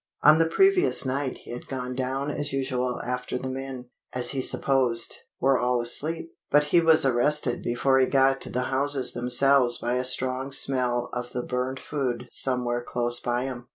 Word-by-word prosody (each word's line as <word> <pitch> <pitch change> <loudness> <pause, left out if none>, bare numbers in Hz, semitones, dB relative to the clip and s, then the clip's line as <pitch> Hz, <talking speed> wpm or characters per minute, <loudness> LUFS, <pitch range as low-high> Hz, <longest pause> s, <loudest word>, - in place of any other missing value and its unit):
On 155 +2 +6
the 165 - +3
previous 385 - +3
night 135 0 -3
he - - -13
had 120 - -8
gone 125 -1 -5
down 135 +3 -3
as 145 0 -2
usual 130 -2 -2
after 125 0 -3
the 130 - -6
men, 130 -2 -7 0.2
as 125 -1 -1
he 135 - -2
supposed, 130 -3 0 0.2
were 135 -1 +2
all 125 0 0
asleep, 160 +7 -3 0.2
but 145 +1 +4
he 170 +4 +3
was 160 -3 +4
arrested 130 0 +1
before 130 +3 +1
he 130 - +3
got 135 0 +2
to - - -5
the 125 - -2
houses 135 -1 +2
themselves 125 0 +4
by 120 - -3
a 125 - -1
strong 130 +1 -1
smell 125 -3 0
of 125 0 -6
the 125 - -3
burnt 130 +2 -3
food 135 -5 -4
somewhere 125 -2 +1
close 120 0 -1
by 120 0 -2
him. 125 -2 -7
130 Hz, 185 wpm, -25 LUFS, 125-135 Hz, 0.2 s, On